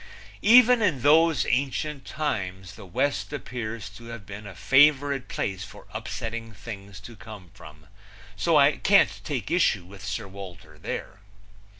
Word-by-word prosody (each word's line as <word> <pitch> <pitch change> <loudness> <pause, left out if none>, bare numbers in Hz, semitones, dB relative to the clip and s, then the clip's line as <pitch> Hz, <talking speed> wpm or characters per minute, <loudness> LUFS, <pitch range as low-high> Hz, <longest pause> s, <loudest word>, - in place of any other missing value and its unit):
Even 245 +2 +7
in 155 - +1
those 160 -1 +4
ancient 140 +3 -1
times 95 - -4
the 95 - -12
West 140 +13 -1
appears 115 -6 -5
to 105 +3 -13
have 115 -3 -9
been 100 +2 -9
a 100 - -10
favorite 140 - +3
place 95 -1 -3
for 100 - -12
upsetting 115 0 -5
things 100 -1 -9
to 115 +4 -12
come 105 -5 -12
from; 75 -6 -14 0.5
so 155 +10 +2
I 145 +1 +5
can't 200 0 +3
take 140 -4 -4
issue 130 - +2
with 95 +1 -13
Sir 100 +2 -4
Walter 95 -3 -11
there. 100 - -6
115 Hz, 150 wpm, -26 LUFS, 100-145 Hz, 0.5 s, Even